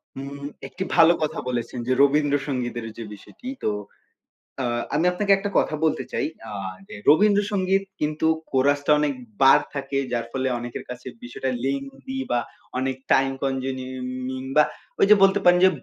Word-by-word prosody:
হুম, 140 +1 -7 0.2
একটি 185 - -5
ভালো 165 0 +7
কথা 155 - -2
বলেছেন 120 0 -3
যে 130 - +3
রবীন্দ্র 145 0 +3
সঙ্গীতের 120 -4 -3
যে 115 - -5
বিষয়টি 105 - -13 0.2
তো - - +2 0.9
আ - - 0 0.3
আমি 160 +4 +2
আপনাকে 200 +2 0
একটা 205 +1 -3
কথা 155 - +2
বলতে 155 - +1
চাই - - -1 0.2
আ - - -7 0.4
যে - - -9
রবীন্দ্র 205 +6 +5
সঙ্গীত 195 -1 +1 0.2
কিন্তু 155 +1 0 0.2
কোরাসটা 140 +2 +2
অনেক 150 -1 +1 0.3
বার 135 0 +8
থাকে 140 -1 -3
যার 120 -1 -1
ফলে 130 0 -1
অনেকের 120 0 -6
কাছে 125 +1 -8 0.2
বিষয়টা 120 +2 -4
লেঙ্গদি 135 -1 -4
বা 120 - +3 0.4
অনেক 130 0 -1 0.2
টাইম 135 0 +3
কনজনিউমিং 130 -1 -3
বাহ 150 0 +6 0.3
ওই - - +6
যে 210 - +9
বলতে 195 +1 +5
পারেন 175 0 +6
যে - - +7
135 Hz, 165 wpm, -24 LUFS, 130-155 Hz, 0.9 s, যে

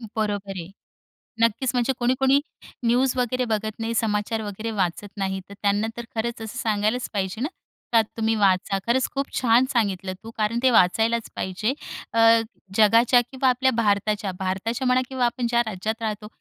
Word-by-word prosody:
बरोबर 205 -2 -2
आहे, 170 +3 -8 0.7
नक्कीच 230 +3 +2
म्हणजे 245 +2 +1
कोणी-कोणी 265 +3 +3 0.5
न्यूज 245 +2 +3
वगैरे 250 +1 0
बघत 215 +1 -3
नाही 225 +1 -2
समाचार 220 0 0
वगैरे 215 +2 -5
वाचत 185 +3 -2
नाही 190 -1 -2
तर 200 - -9
त्यांना 205 +2 +1
तर 235 - -5
खरंच 230 +1 -2
असं 220 +2 -7
सांगायलाच 220 +2 0
पाहिजे 195 +2 -2
ना, 275 - +1 0.5
तर 225 - +7 0.2
तुम्ही 225 0 +1
वाचा 195 -1 +2
खरंच 255 +2 +2
खूप 275 0 -1
छान 245 +1 +4
सांगितलं 195 -5 0
तू 225 - -8
कारण 220 +2 0
ते 260 - +6
वाचायलाच 225 +3 +3
पाहिजे. 200 +7 -1 0.4
अ, 230 - +1 0.6
जगाच्या 230 +3 +5
किंवा 260 +2 0
आपल्या 260 +1 +2
भारताच्या 210 -3 0
भारताच्या 225 +7 -2
म्हणा 255 0 +4
किंवा 260 -2 0
आपण 240 0 -1
ज्या 235 0 +3
राज्यात 220 +3 -3
राहतो 215 -1 -3
225 Hz, 165 wpm, -24 LUFS, 205-245 Hz, 0.7 s, तर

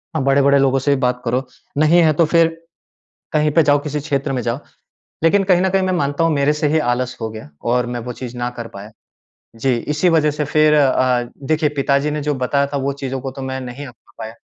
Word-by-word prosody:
आप 160 - 0
बड़े-बड़े 140 +1 +4
लोगों 135 0 +2
से 140 +2 +1
भी 130 - -5
बात 125 -1 0
करो, 125 +3 0 0.3
नहीं 155 +4 +4
है, 155 -1 +4
तो 165 +3 +3
फिर 165 +1 +4 0.9
कहीं 150 0 +2
पे 160 +2 +4
जाओ, 145 0 +3
किसी 150 0 -4
क्षेत्र 140 -2 -2
में 125 - -1
जाओ। 120 +2 -2 0.6
लेकिन 195 +5 +4
कहीं 180 -2 +3
न 190 - +2
कहीं 190 0 +1
मैं 185 - 0
मानता 145 -2 0
हूँ 165 -1 +2
मेरे 140 +1 +2
से 150 0 -1
ही 160 +2 +2
आलस 130 +1 -4
हो 110 - -2
गया 110 -9 -10 0.2
और 125 -1 +1
मैं 120 0 -4
वो - - -4
चीज़ 125 -1 -6
ना 120 0 -2
कर 115 -1 -5
पाया। 100 +1 -11 0.6
जी, 125 +2 0
इसी 150 +8 0
वजह 155 -3 +3
से 150 0 -3
फिर 155 +1 +3
अ, 130 -3 +3 0.3
देखिए 155 0 +2
पिताजी 140 +2 +1
ने 150 0 -3
जो 150 +1 -1
बताया 140 +2 0
था, 140 - -3
वो 140 +1 -1
चीज़ों 135 -1 -5
को 135 0 -5
तो 135 - -9
मैं 130 0 -4
नहीं 130 +3 -7
अपना 120 -1 -17
पाया। 110 0 -6
140 Hz, 240 wpm, -19 LUFS, 130-150 Hz, 0.9 s, बड़े-बड़े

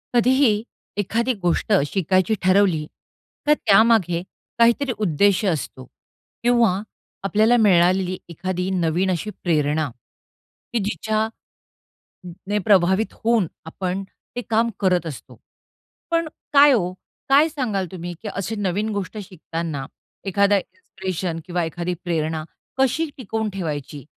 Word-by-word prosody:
कधीही 255 +2 +4 0.5
एखादी 230 +5 0
गोष्ट 175 +4 +1
शिकायची 185 +4 +1
ठरवली, 185 -4 +3 0.6
तर 300 - +7
त्यामागे 210 - +4 0.4
काहीतरी 235 +4 +4
उद्देश 195 +4 +3
असतो 150 -7 -2 0.6
किंवा 235 -5 +3 0.4
आपल्याला 215 +4 +3
मिळालेली 185 -3 +3
एखादी 180 +2 -3
नवीन 180 +1 +1
अशी 180 +4 -2
प्रेरणा 150 -3 +1 0.8
की 235 - +2
जिच्या 215 +1 -1
अ, 225 - -13 1.0
ने 205 +1 +1
प्रभावित 190 +1 +3
होऊन 230 -4 +3 0.2
आपण 185 +3 -3 0.3
ते - - 0
काम 230 +1 +2
करत 180 -3 +2
असतो. 150 -5 -9 0.7
पण 335 -1 +1 0.2
काय 290 0 +8
ओ, 180 -8 +1 0.4
काय 285 +4 +6
सांगाल 240 - -2
तुम्ही, 175 -1 -6
की 220 - -4
असे 195 +3 -3
नवीन 205 +1 -1
गोष्ट 200 +2 -4
शिकताना 165 -6 -5 0.4
एखादा 200 +1 +3
इन्स्पिरेशन 185 -2 -4
किंवा 175 -1 -1
एखादी 170 +2 -3
प्रेरणा 160 -2 -1 0.3
कशी 265 +5 +2
टिकवून 220 -3 -3
ठेवायची. 150 -6 -5
190 Hz, 115 wpm, -22 LUFS, 175-220 Hz, 1.0 s, काय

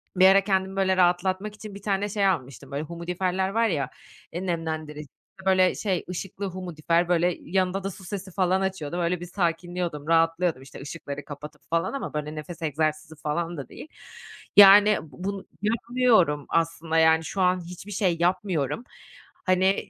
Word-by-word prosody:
bir 185 +1 +7
ara 195 +1 +6
kendimi, 190 -1 0
böyle, 190 -1 +2
rahatlatmak 185 +3 +1
için 210 -1 -9
bir 200 - -9
tane 200 0 -1
şey 200 0 0
almıştım, 140 - -3
böyle, 140 +2 -2
humidifier'ler 180 +3 -2
var 225 +3 +2
ya, 150 -9 -1 0.4
eee, 175 +3 -4
nemlendirici, 160 -3 -3 0.4
böyle, 185 -1 +4
şey, 190 -5 -1
ışıklı 190 +2 -5
humidifier 175 -2 -1
böyle, 175 0 +2
yanında 185 +2 0
da 195 - -3
su 190 - -12
sesi 190 0 -6
falan 185 +1 +1
açıyordum, 180 -4 -3
öyle 175 0 0
bir 175 - -6
sakinliyordum, 175 -3 -2
rahatlıyordum, 165 -2 +2
işte, 135 0 -11
ışıkları 145 -1 -7
kapatıp 150 +1 -9
falan 165 +7 0
ama, 275 - -4
böyle, 150 0 -4
nefes 155 +3 -8
egzersizi 155 0 -1
falan 165 +3 -3
da 135 -3 -7
değil. - - -10 0.7
Yani, 205 +1 +9
bu 155 +2 -12
bunu 195 0 -3 0.2
yapmıyorum 220 - +2
aslında, 165 -1 0
yani, 160 0 +5
şu 190 +5 -3
an 180 0 +3
hiçbir 180 +4 -9
şey 185 -3 +1
yapmıyorum. 180 - 0 0.6
Hani, 185 +1 +2
180 Hz, 165 wpm, -26 LUFS, 160-190 Hz, 0.7 s, Yani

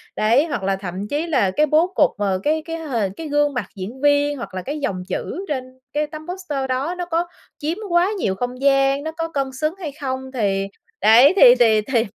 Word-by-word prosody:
Đấy, 235 +8 +3
hoặc 240 - -3
là 195 0 +1
thậm 190 +1 -6
chí 300 +6 -2
là 240 - +2
cái 300 +10 +2
bố 310 +4 +3
cục, - - +4
ờ, 195 -2 0
cái 310 +1 +1
cái 330 0 -4
h 300 -6 -5 0.2
cái 325 - -6
gương 290 0 +1
mặt 250 - -2
diễn 210 +8 -7
viên 290 0 +3
hoặc 235 - -7
là 185 - -4
cái 290 +10 -5
dòng 185 -9 -3
chữ 390 +3 -4
trên 260 -3 -5
cái 300 0 0
tấm 310 +2 -10
poster 305 -8 -4
đó 275 +8 -1
nó 355 - -3
có 345 0 -1 0.3
chiếm 320 +5 -3
quá 345 +2 +3
nhiều 190 - 0
không 245 +3 -4
gian, 275 0 +3
nó 320 - -3
có 330 0 -4
cân 275 -2 -2
xứng 305 +5 -2
hay 310 -5 -5
không? 260 -1 -4
Thì 195 -5 0 0.3
đấy, 240 +8 +7
thì - - +8
thì 220 -2 +5
thì 230 0 0
275 Hz, 225 wpm, -21 LUFS, 235-310 Hz, 0.3 s, thì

